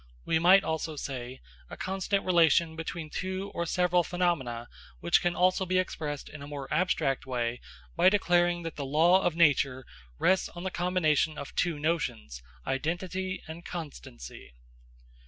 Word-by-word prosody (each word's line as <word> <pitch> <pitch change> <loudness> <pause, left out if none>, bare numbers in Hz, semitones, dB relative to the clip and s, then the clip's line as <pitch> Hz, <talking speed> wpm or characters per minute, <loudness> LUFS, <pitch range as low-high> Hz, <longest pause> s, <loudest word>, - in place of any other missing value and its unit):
We 160 - +2
might 185 +4 +6
also 160 0 -3
say: 130 -3 -6 0.3
a - - -8
constant 195 +1 -1
relation 170 -2 +4
between 160 -1 -6
two 190 +2 -4
or 170 0 -2
several 180 0 +2
phenomena, 145 -11 -1 0.3
which 85 - +3
can 175 0 0
also 185 +1 +3
be 185 0 0
expressed 150 -5 -3
in 155 - -10
a 140 - -8
more 145 -2 -6
abstract 150 -6 0
way 120 -1 -2 0.3
by - - +6
declaring 175 -3 +2
that 165 -2 -6
the 145 - -3
law 165 +7 +4
of 175 -3 0
nature 135 -5 +3 0.3
rests 190 +1 +2
on 175 - -9
the 190 - -3
combination 160 -4 +1
of - - -7
two 170 -4 0
notions, 145 - -2 0.2
identity 185 +6 -3
and 160 +2 -8
constancy. 60 - -9
165 Hz, 155 wpm, -29 LUFS, 140-180 Hz, 0.3 s, might